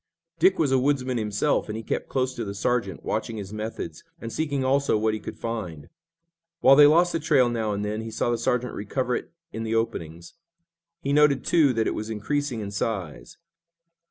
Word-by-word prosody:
Dick 185 +3 +4
was 150 -4 +1
a 135 - +4
woodsman 130 -2 0
himself, 105 +7 0
and 105 - -3
he 115 - -6
kept - - -3
close 130 -1 0
to 120 - -4
the 100 -2 -5
sergeant, 100 -2 -1
watching 110 +1 -2
his 100 -1 -7
methods, 110 +1 -6 0.2
and 115 -1 -7
seeking 145 -4 -1
also 140 -3 +2
what 110 0 +1
he 110 - -3
could - - -8
find. 90 -10 -5 0.7
While 135 +1 +7
they 145 +1 +9
lost 170 +4 +4
the 165 - 0
trail 140 -5 +3
now 110 -3 -1
and 100 0 -2
then, 105 +1 -3
he 115 - -6
saw 120 - -1
the 120 - -1
sergeant 125 +1 0
recover 125 +4 -2
it - - -5 0.2
in 110 - -4
the 115 0 -1
openings. 85 -7 -3 0.7
He 140 - 0
noted, 145 -3 +4
too, 155 -5 +4
that 115 -1 0
it - - 0
was 110 +1 -5
increasing 125 +3 -2
in 100 -1 -5
size. 100 -6 -4
115 Hz, 205 wpm, -25 LUFS, 105-135 Hz, 0.7 s, they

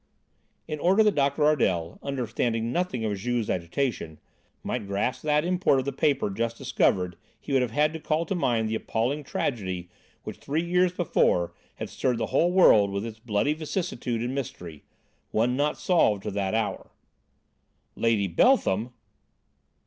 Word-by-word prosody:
'" - - -45
In 155 -1 -4
order 195 +7 +4
that 210 -1 +3
Doctor 140 +1 +1
Ardel, 95 - +1
understanding 120 -3 -2
nothing 165 -9 -1
of 105 -2 -1
Juve's 120 +3 -1
agitation, 85 - -2 0.5
might 100 - -3
grasp 100 +5 -1
that 150 +1 +1
import 180 -5 +2
of 130 - -1
the 140 - -1
paper 135 -5 +1
just 115 +3 -2
discovered 90 -2 0 0.2
he 140 - -6
would 135 - +4
have 125 - 0
had 150 +6 +1
to 160 - -5
call 155 +2 -1
to 195 - -2
mind 120 -11 +1
the 110 - -3
appalling 120 +6 -1
tragedy 95 -10 -3 0.3
which - - -7
three 155 +4 -2
years 180 +1 +2
before 90 - +1 0.2
had - - -5
stirred 125 -2 -1
the 115 - -1
whole 175 - +3
world 110 - +6
with 100 +2 -3
its 110 -1 -8
bloody 115 +6 0
vicissitude 155 - -3
and 125 +2 -2
mystery, 90 - -6 0.5
one 120 +3 +1
not 145 +2 0
solved 110 - +2
to 105 - -3
that 100 +1 -1
hour. 110 -2 -2 1.1
"Lady 115 -3 +1
Beltham!" 110 - +2
120 Hz, 165 wpm, -26 LUFS, 105-150 Hz, 1.1 s, world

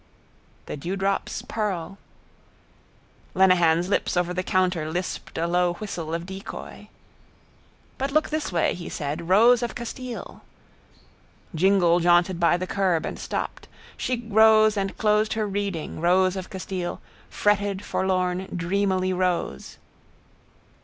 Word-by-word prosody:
—The - - -6
dewdrops 195 +5 -2
pearl... 195 -4 -3 1.4
Lenehan's 175 -3 +4
lips 190 - 0
over 180 0 +1
the 180 - -1
counter 180 -4 0
lisped 180 +3 -4
a 165 - 0
low 175 0 +2
whistle 175 -5 -5
of 170 +1 -4
decoy. 190 +1 -8 1.1
—But 270 +1 -1
look 310 +2 +2
this 310 -6 -2
way, 170 -2 +1
he 175 - -7
said, 155 +3 -4
rose 230 +5 +6
of 240 - -3
Castile. 245 0 -7 1.1
Jingle 175 0 +3
jaunted 175 +1 +3
by 170 0 +3
the 185 - -3
curb 185 -4 0
and - - -5
stopped. - - -4 0.3
She 240 -2 -3
rose 220 0 +5
and 195 -1 -2
closed 215 0 +2
her 220 -1 -1
reading, 195 -7 -3
rose 185 +2 +3
of 190 -1 -6
Castile: 185 -2 -4 0.3
fretted, 205 -1 0
forlorn, 185 0 -1
dreamily 185 +1 0
rose. 180 - -2
185 Hz, 125 wpm, -25 LUFS, 175-205 Hz, 1.4 s, rose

